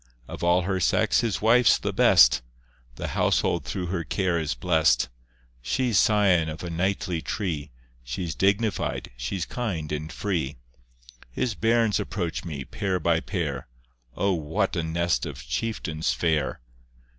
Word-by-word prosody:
Of - - -7
all 90 +1 +3
her 95 +1 -1
sex 85 - +2
his 110 -4 -2
wife's 120 +2 +5
the - - -3
best, 60 +1 +6 0.5
The - - -4
household - - +1
through 90 - -3
her 85 -3 -1
care 90 0 0
is 75 -6 -2
blest; 80 +4 +2 0.5
She's 105 - +1
scion 95 -7 +3
of 80 +2 -7
a 85 - -4
knightly 90 -1 -1
tree, 80 -7 -3 0.3
She's 80 +7 -4
dignified, 100 +4 0
she's 65 +9 -3
kind 90 -12 -4
and 75 +1 -4
free. 80 -10 -2 0.7
His 110 - -2
bairns 115 0 +2
approach 90 -5 -3
me, 75 -6 -5
pair 95 -2 -2
by 85 0 +2
pair, - - -3 0.5
O 100 -1 +2
what 85 +5 -1
a 85 - 0
nest 85 +1 0
of - - -8
chieftains 80 - -2
fair! 75 -1 0
85 Hz, 145 wpm, -25 LUFS, 80-100 Hz, 0.7 s, best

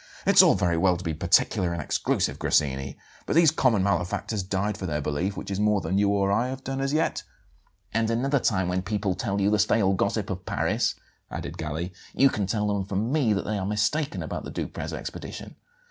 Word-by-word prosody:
"It's - - +8
all - - +5
very 85 -2 +1
well 90 +1 +3
to 90 - -8
be 80 -2 -2
particular 85 +3 +2
and 85 - -4
exclusive, 75 - -1
Grassini; 70 -2 0 0.3
but - - -1
these 165 -3 +6
'common 120 -10 +2
malefactors' 100 +2 -1
died 95 +2 -1
for 95 -3 -5
their 75 -2 -1
belief, 80 +7 -2
which - - -6
is 100 - -2
more 105 -1 +3
than 95 +3 -1
you 100 -1 +3
or 100 -1 +1
I 115 +5 +2
have 130 +1 -6
done 135 0 -3
as 135 0 0
yet." 155 +2 0 0.7
"And 115 0 +1
another 135 +5 +1
time 95 -6 +1
when 90 +1 0
people 100 -1 -1
tell 100 -1 -2
you 100 +1 +2
the 105 - +2
stale 100 -2 +3
gossip 95 - -1
of - - -5
Paris," - - 0 0.3
added - - -6
Galli, 80 +3 -4 0.2
"you 135 - +5
can 100 -2 -2
tell 105 0 0
them 100 -1 0
from 100 +5 -2
me 140 -7 +2
that 100 - -2
they 105 -1 -2
are 95 - -3
mistaken 110 +9 0
about - - -5
the - - -7
Duprez - - -5
expedition. - - -7
100 Hz, 215 wpm, -26 LUFS, 90-115 Hz, 0.7 s, It's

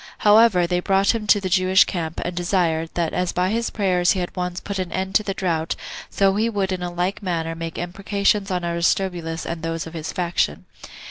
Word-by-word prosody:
However, 210 -4 +6
they 180 +1 0
brought 195 +3 +2
him 220 -2 -4
to 205 - +5
the 195 - -3
Jewish 185 +1 +5
camp, 165 -3 -4
and 180 - -3
desired, 175 -3 0
that 170 -2 -1
as 180 -1 0
by 180 +2 0
his 230 +1 0
prayers 180 -4 +2
he 190 - -2
had 175 - -4
once 180 -1 -3
put 200 -1 -5
an 185 -2 -3
end 190 0 -3
to - - +4
the 195 -2 -4
drought, 165 -4 -1 0.3
so 195 -1 +2
he 225 +2 +2
would 200 -3 -1
in 185 -1 -2
like 180 +4 -1
manner 165 -4 -2
make 165 0 -6
imprecations 200 +3 0
on 180 -2 -1
Aristobulus 170 -1 -1
and 170 -1 -4
those 165 0 -3
of 165 - -9
his 160 -2 -5
faction. 170 - -1
180 Hz, 210 wpm, -22 LUFS, 170-195 Hz, 0.3 s, However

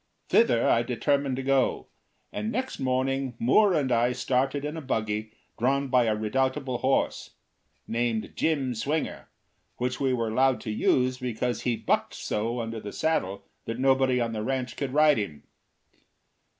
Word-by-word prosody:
Thither 170 - +4
I 115 - +4
determined 135 +3 0
to 130 - -4
go, 135 -1 +1 0.5
and 215 +1 -3
next 260 +3 -3
morning 130 0 -1
Moore 185 - +4
and 140 -4 0
I 120 +1 +3
started 135 +3 0
in 150 +2 -4
a 160 - -5
buggy 110 -5 -2 0.3
drawn 135 +3 +1
by 125 -2 +4
a 110 -1 +1
redoubtable 130 +4 -1
horse, 135 +1 0 0.5
named 115 -1 -1
Jim 140 -6 0
Swinger, 145 +7 -3 0.5
which 125 +1 -2
we 135 -2 +1
were 115 -3 0
allowed 130 +3 +2
to 110 - -4
use 125 +4 +1
because 125 -1 -2
he 120 -2 0
bucked - - -1
so 115 +3 -2
under 115 0 -5
the 105 -1 -7
saddle 100 -12 -1 0.2
that 115 - -4
nobody 130 -1 +3
on 115 -1 -1
the 110 -1 -3
ranch 125 +1 -2
could 140 -3 -3
ride 150 -2 +4
him. 80 -9 -5
130 Hz, 160 wpm, -27 LUFS, 115-135 Hz, 0.5 s, Thither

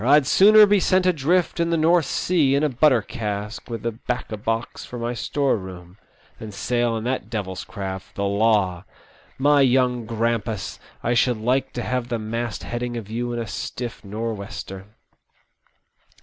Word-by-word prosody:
I*d 145 +3 +5
sooner 210 +8 +7
be 205 0 +3
sent 185 0 +2
adrift 175 +1 +1
in 170 0 +1
the 170 - +1
North 165 -1 +3
Sea 150 -7 +2
in 140 - +1
a 150 - +3
butter 130 -3 +3
cask, 105 -1 -5
with 115 -1 -5
a 115 - +1
'bacco 115 0 -4
box 115 +2 -3
for 125 - -8
my 120 +1 -2
store 140 +3 0
room, 95 0 -10 0.4
than 110 -1 -7
sail 120 +3 0
in 110 - -5
that 125 -3 -2
devil's 95 -5 -4
craft, 95 -2 -7
the 100 - -2
Law. 100 -3 +2 0.5
My 145 +1 +4
young 125 -3 +2
grampus, 115 -2 -2 0.2
I 120 - +1
should 120 0 +2
like 125 +5 0
to 120 - -3
have 125 -1 -2
the 120 -2 -2
mast 115 +1 -4
heading 120 0 -4
of 110 -2 -7
you 120 +2 -2
in 120 - -3
a 115 - -2
stiflf 120 +3 -6
north 110 +1 -4
wester 95 -1 -7
120 Hz, 175 wpm, -23 LUFS, 110-135 Hz, 0.5 s, sooner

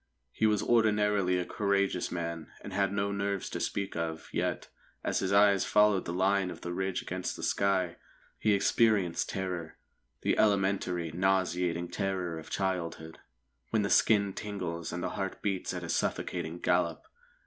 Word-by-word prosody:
He 110 - +2
was 105 -1 +2
ordinarily 105 -5 +3
a 90 - -1
courageous 100 -2 0
man, 85 -2 -4
and 100 - -8
had 100 0 +1
no 100 0 0
nerves 100 -1 -2
to - - -3
speak 100 -1 -2
of; 80 -1 -4
yet, - - -1 0.4
as - - 0
his 95 - -1
eyes 100 -1 +5
followed 105 -3 +3
the - - -3
line 95 +1 +2
of - - -8
the 85 - -4
ridge 95 +1 -2
against 90 0 -3
the - - -8
sky, 95 -3 +1 0.4
he 105 - +3
experienced 100 -3 +2
terror, 90 -4 -4 0.4
the - - +1
elementary, 95 -5 +1
nauseating 90 -1 +1
terror 90 -4 -2
of 80 - -11
childhood, 85 -4 -3 0.5
when 110 -2 +1
the 100 - -1
skin 100 -3 +4
tingles, 90 -6 -4
and 90 +1 -4
the - - -1
heart 95 -1 -4
beats 100 -3 -1
at - - -5
a - - -5
suffocating 80 +2 -1
gallop. 90 -1 0
95 Hz, 160 wpm, -30 LUFS, 85-100 Hz, 0.5 s, eyes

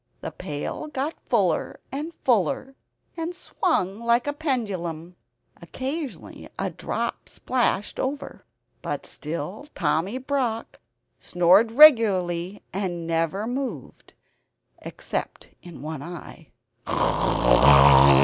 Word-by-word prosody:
The - - -5
pail 145 - -5
got 295 +1 -3
fuller - - 0
and 295 +5 -4
fuller, 240 - +1 0.4
and 335 +1 -4
swung 210 - -1
like 235 +1 +2
a 290 - -2
pendulum. 190 - -3 0.5
Occasionally 275 +1 -6
a - - -2
drop - - -4
splashed 245 -5 -1
over; 275 +2 -4 0.4
but - - -4
still 170 - -6
Tommy 185 +10 0
Brock 260 -4 -3 0.4
snored 180 +6 +4
regularly 205 - +5
and 175 -3 -3
never 165 +5 -1
moved, 255 +3 -6 0.7
except - - -6
in 170 -6 -11
one 155 -2 -5
eye. 170 +3 -10
220 Hz, 95 wpm, -24 LUFS, 175-270 Hz, 0.7 s, regularly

